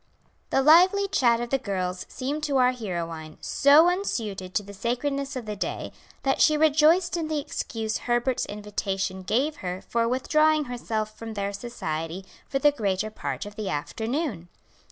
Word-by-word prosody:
The 270 Hz, -, +2 dB
lively 365 Hz, +7 st, +6 dB
chat 235 Hz, -9 st, +3 dB
of 240 Hz, 0 st, -4 dB
the 270 Hz, -, +2 dB
girls 185 Hz, -4 st, -3 dB
seemed 280 Hz, +4 st, -3 dB
to 280 Hz, -2 st, +1 dB
our 250 Hz, -1 st, +5 dB
heroine 170 Hz, -9 st, -5 dB
so 290 Hz, +4 st, +5 dB
unsuited 215 Hz, -, -2 dB
to 210 Hz, -, +1 dB
the 200 Hz, 0 st, -11 dB
sacredness 275 Hz, +6 st, -2 dB
of 250 Hz, -3 st, -5 dB
the 210 Hz, -1 st, -4 dB
day 200 Hz, -, -4 dB, 0.3 s
that 270 Hz, 0 st, +1 dB
she 305 Hz, -1 st, +5 dB
rejoiced 315 Hz, +4 st, +4 dB
in 325 Hz, -2 st, -2 dB
the 310 Hz, -1 st, -1 dB
excuse 225 Hz, -6 st, -3 dB
Herbert's 240 Hz, +1 st, 0 dB
invitation 195 Hz, -2 st, -3 dB
gave 260 Hz, +11 st, 0 dB
her 180 Hz, 0 st, -4 dB
for 230 Hz, +3 st, -1 dB
withdrawing 305 Hz, +5 st, +3 dB
herself 225 Hz, -4 st, -3 dB
from 225 Hz, -1 st, -7 dB
their 200 Hz, 0 st, -2 dB
society 185 Hz, -5 st, -4 dB, 0.2 s
for 270 Hz, -, 0 dB
the 290 Hz, +2 st, +5 dB
greater 215 Hz, -5 st, -1 dB
part 215 Hz, -, -4 dB
of 205 Hz, 0 st, -9 dB
the 210 Hz, -3 st, -4 dB
afternoon. 220 Hz, -, -3 dB
235 Hz, 165 wpm, -26 LUFS, 200-290 Hz, 0.3 s, lively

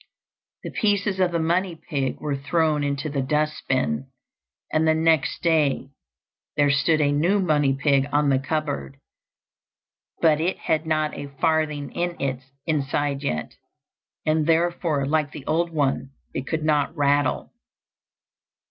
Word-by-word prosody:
The -, -, -5 dB
pieces 205 Hz, -2 st, 0 dB
of 180 Hz, -2 st, +3 dB
the 170 Hz, -, 0 dB
money 170 Hz, +2 st, 0 dB
pig 140 Hz, -4 st, -3 dB
were 150 Hz, -2 st, -2 dB
thrown 150 Hz, +1 st, +1 dB
into 140 Hz, +1 st, -2 dB
the 140 Hz, -2 st, -1 dB
dust 150 Hz, +3 st, 0 dB
bin, 75 Hz, -, 0 dB, 0.7 s
and 155 Hz, +1 st, +3 dB
the 160 Hz, -, +4 dB
next 160 Hz, -3 st, +1 dB
day 150 Hz, -5 st, +2 dB, 0.7 s
there 145 Hz, -1 st, +4 dB
stood 155 Hz, +3 st, +2 dB
a 145 Hz, -1 st, +3 dB
new 170 Hz, +8 st, +2 dB
money 150 Hz, -7 st, +2 dB
pig 140 Hz, -2 st, +3 dB
on 145 Hz, 0 st, +2 dB
the 135 Hz, -1 st, +3 dB
cupboard, 135 Hz, -, -3 dB, 1.2 s
but 155 Hz, -2 st, +4 dB
it 180 Hz, +3 st, 0 dB
had 155 Hz, 0 st, -1 dB
not 155 Hz, -1 st, 0 dB
a 145 Hz, -, -6 dB
farthing 155 Hz, -3 st, 0 dB
in 175 Hz, 0 st, -3 dB
its 130 Hz, -1 st, -2 dB, 0.2 s
inside 145 Hz, -2 st, -1 dB
yet, 75 Hz, -, -3 dB, 0.7 s
and 155 Hz, 0 st, +2 dB
therefore, 165 Hz, -3 st, +1 dB
like 150 Hz, 0 st, 0 dB
the 145 Hz, -3 st, -9 dB
old 170 Hz, +2 st, +1 dB
one, 140 Hz, -4 st, 0 dB, 0.2 s
it 135 Hz, -, -4 dB
could 160 Hz, -1 st, -2 dB
not 150 Hz, +1 st, +1 dB
rattle. 145 Hz, -1 st, +1 dB
150 Hz, 145 wpm, -24 LUFS, 140-160 Hz, 1.2 s, the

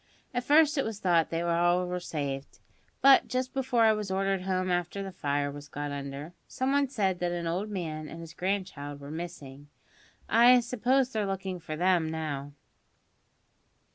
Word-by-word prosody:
At 245 Hz, 0 st, -1 dB
first 300 Hz, +2 st, +4 dB
it -, -, +2 dB
was 220 Hz, -2 st, -4 dB
thought 170 Hz, -4 st, +2 dB
that 165 Hz, +1 st, -1 dB
all 175 Hz, +1 st, +2 dB
were 180 Hz, 0 st, -3 dB
saved; 140 Hz, -5 st, -4 dB, 0.5 s
but 275 Hz, 0 st, +7 dB
just 255 Hz, 0 st, -2 dB
before 255 Hz, -3 st, +1 dB
I 220 Hz, -1 st, +6 dB
was 210 Hz, -2 st, -3 dB
ordered 195 Hz, 0 st, 0 dB
home 185 Hz, 0 st, -1 dB
after 175 Hz, +3 st, -1 dB
the 195 Hz, -, -6 dB
fire 145 Hz, -4 st, -1 dB
was 145 Hz, +1 st, -9 dB
got 145 Hz, 0 st, -5 dB
under, 140 Hz, +3 st, -6 dB
some 260 Hz, +1 st, -1 dB
one 280 Hz, 0 st, +3 dB
said 195 Hz, -8 st, 0 dB
that 175 Hz, -1 st, -1 dB
an 175 Hz, -1 st, -3 dB
old 180 Hz, +6 st, -2 dB
man 155 Hz, -6 st, -4 dB
and 165 Hz, -, -9 dB
his 165 Hz, -1 st, -9 dB
grandchild 180 Hz, -7 st, -3 dB
were 140 Hz, +1 st, -9 dB
missing. 145 Hz, -4 st, -8 dB, 0.6 s
I 240 Hz, +2 st, +7 dB
suppose 250 Hz, +2 st, +1 dB
they're 215 Hz, -4 st, -1 dB
looking 190 Hz, -1 st, -3 dB
for 155 Hz, -2 st, -6 dB
them 175 Hz, -1 st, +2 dB
now." 145 Hz, -3 st, -4 dB
180 Hz, 175 wpm, -29 LUFS, 155-215 Hz, 0.6 s, but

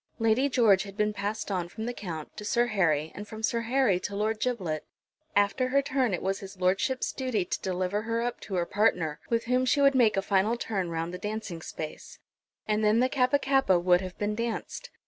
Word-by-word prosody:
Lady 230 Hz, +5 st, +2 dB
George 225 Hz, -7 st, +4 dB
had 200 Hz, -1 st, -8 dB
been 210 Hz, 0 st, +1 dB
passed 205 Hz, +1 st, -3 dB
on 180 Hz, -3 st, -2 dB
from 220 Hz, +5 st, -6 dB
the 245 Hz, -, -2 dB
Count 165 Hz, -9 st, -7 dB
to -, -, -7 dB
Sir 235 Hz, +3 st, +2 dB
Harry, 160 Hz, -9 st, +1 dB
and 205 Hz, +1 st, -8 dB
from 220 Hz, +1 st, -9 dB
Sir 230 Hz, +1 st, +1 dB
Harry 235 Hz, -5 st, +2 dB
to 200 Hz, -, -5 dB
Lord 215 Hz, +2 st, 0 dB
Giblet. 190 Hz, -11 st, -2 dB, 0.5 s
After 205 Hz, +6 st, +2 dB
her 275 Hz, +2 st, +2 dB
turn 260 Hz, -4 st, +1 dB
it 180 Hz, -, -2 dB
was 195 Hz, +1 st, -1 dB
his 195 Hz, -1 st, -10 dB
lordship's 190 Hz, +8 st, +1 dB
duty 255 Hz, -8 st, -1 dB
to -, -, -3 dB
deliver 185 Hz, +2 st, -1 dB
her 230 Hz, +1 st, -2 dB
up 240 Hz, 0 st, -3 dB
to 195 Hz, -, -6 dB
her 175 Hz, -1 st, +1 dB
partner, 175 Hz, -7 st, +1 dB
with 230 Hz, -1 st, +1 dB
whom 250 Hz, +2 st, +2 dB
she 255 Hz, +3 st, +2 dB
would 280 Hz, 0 st, +5 dB
make 235 Hz, -6 st, +4 dB
a 195 Hz, -, +1 dB
final 200 Hz, +4 st, +2 dB
turn 195 Hz, -6 st, -2 dB
round 165 Hz, +1 st, -3 dB
the 180 Hz, -, -5 dB
dancing 210 Hz, -5 st, -5 dB
space; 155 Hz, -1 st, -7 dB, 0.5 s
and 215 Hz, 0 st, +1 dB
then 215 Hz, +2 st, +4 dB
the 255 Hz, +1 st, +3 dB
Kappa 260 Hz, 0 st, +3 dB
kappa 270 Hz, -9 st, +3 dB
would 180 Hz, +1 st, +3 dB
have 185 Hz, -1 st, -7 dB
been 210 Hz, 0 st, -1 dB
danced. 230 Hz, +1 st, -4 dB
210 Hz, 220 wpm, -28 LUFS, 185-240 Hz, 0.5 s, would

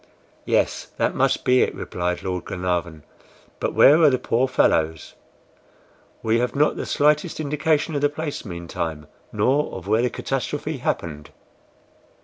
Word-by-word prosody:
'" -, -, -34 dB
"Yes, -, -, +1 dB
that -, -, +1 dB
must -, -, +1 dB
be 125 Hz, 0 st, +4 dB
it," -, -, 0 dB
replied 90 Hz, 0 st, -3 dB
Lord 90 Hz, -2 st, -3 dB
Glenarvan. 90 Hz, -4 st, -3 dB, 0.6 s
"But -, -, -2 dB
where 150 Hz, +4 st, +7 dB
are 155 Hz, -, +7 dB
the 130 Hz, -, +1 dB
poor 125 Hz, +1 st, 0 dB
fellows? 80 Hz, -, +1 dB, 1.1 s
We 110 Hz, +1 st, +2 dB
have 125 Hz, +3 st, -1 dB
not 150 Hz, +2 st, +2 dB
the -, -, -5 dB
slightest 150 Hz, +3 st, +1 dB
indication 150 Hz, +1 st, 0 dB
of 145 Hz, -, -1 dB
the 145 Hz, -, +3 dB
place, 145 Hz, 0 st, -5 dB
meantime, 85 Hz, -5 st, -5 dB, 0.3 s
nor 145 Hz, +3 st, +1 dB
of 95 Hz, 0 st, -8 dB
where 110 Hz, +2 st, +3 dB
the 125 Hz, -, +1 dB
catastrophe 140 Hz, +5 st, -3 dB
happened." 75 Hz, -, -3 dB
125 Hz, 150 wpm, -23 LUFS, 90-145 Hz, 1.1 s, where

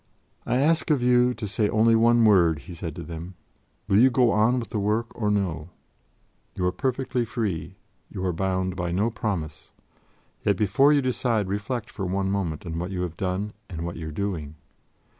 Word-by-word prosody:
"I -, -, +1 dB
ask 160 Hz, +5 st, +2 dB
of 145 Hz, -5 st, +2 dB
you 125 Hz, 0 st, +4 dB
to 110 Hz, -2 st, -5 dB
say 105 Hz, +1 st, 0 dB
only 115 Hz, +1 st, +4 dB
one 115 Hz, +1 st, +4 dB
word," 85 Hz, -7 st, +5 dB
he 90 Hz, -, -10 dB
said 80 Hz, -2 st, -6 dB
to -, -, -6 dB
them: 85 Hz, +2 st, -8 dB, 0.5 s
"will 100 Hz, -, +4 dB
you 130 Hz, +3 st, +7 dB
go 120 Hz, -1 st, +3 dB
on 110 Hz, +5 st, +3 dB
with 115 Hz, -, -6 dB
the 105 Hz, -, -2 dB
work 110 Hz, +3 st, 0 dB
or 105 Hz, -3 st, -1 dB
no? 90 Hz, -6 st, -1 dB, 0.9 s
You 90 Hz, -, -1 dB
are 90 Hz, -, +2 dB
perfectly 130 Hz, +4 st, -1 dB
free; 95 Hz, -7 st, -3 dB, 0.3 s
you 95 Hz, -2 st, -5 dB
are 90 Hz, -, 0 dB
bound 95 Hz, +1 st, -1 dB
by 90 Hz, -2 st, -2 dB
no 105 Hz, +6 st, +1 dB
promise. 80 Hz, -9 st, -4 dB, 0.7 s
Yet, 100 Hz, -3 st, +2 dB
before 115 Hz, +9 st, +4 dB
you 145 Hz, -2 st, +3 dB
decide, 120 Hz, -5 st, 0 dB
reflect 105 Hz, +4 st, -3 dB
for 95 Hz, -, -4 dB
one 95 Hz, +1 st, -1 dB
moment 90 Hz, -5 st, -2 dB
on 85 Hz, -1 st, -4 dB
what 90 Hz, +2 st, -3 dB
you 95 Hz, -2 st, -3 dB
have 85 Hz, -2 st, -4 dB
done, 95 Hz, +3 st, -2 dB, 0.2 s
and 85 Hz, -2 st, -5 dB
what 85 Hz, -, -5 dB
you 80 Hz, -1 st, -6 dB
are -, -, -5 dB
doing. 80 Hz, -4 st, -4 dB
100 Hz, 195 wpm, -25 LUFS, 90-115 Hz, 0.9 s, you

